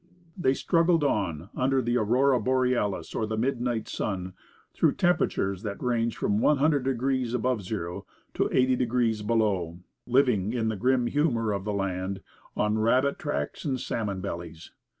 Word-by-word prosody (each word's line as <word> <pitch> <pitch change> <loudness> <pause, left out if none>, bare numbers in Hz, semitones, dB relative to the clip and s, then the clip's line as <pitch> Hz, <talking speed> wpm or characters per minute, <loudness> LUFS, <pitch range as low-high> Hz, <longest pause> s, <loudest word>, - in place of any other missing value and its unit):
They 135 -8 +1
struggled 165 -1 +2
on, 95 - -1
under 135 +1 +2
the 120 -1 0
aurora 125 +4 +3
borealis 125 -3 0
or 110 - -1
the 110 0 -3
midnight 120 -1 -1
sun, 95 -3 -3 0.4
through - - +2
temperatures 160 - +1
that 105 -3 -5
ranged 115 -2 0
from 105 +1 0
one 150 +5 +3
hundred 145 -2 +2
degrees 130 -1 0
above 125 -1 0
zero 90 -3 -5 0.3
to - - 0
eighty 130 0 +3
degrees 120 -3 0
below, 105 -6 0 0.3
living, 120 -5 +2
in 115 -3 0
the 110 - -2
grim 125 +4 +2
humour 120 -5 +1
of 100 -1 -3
the 105 - -1
land, 95 -1 -2 0.4
on 105 +1 +1
"rabbit 130 +5 +2
tracks 145 - -3
and 135 -4 -1
salmon 100 -6 -3
bellies." 85 -3 -7
115 Hz, 155 wpm, -27 LUFS, 100-130 Hz, 0.4 s, aurora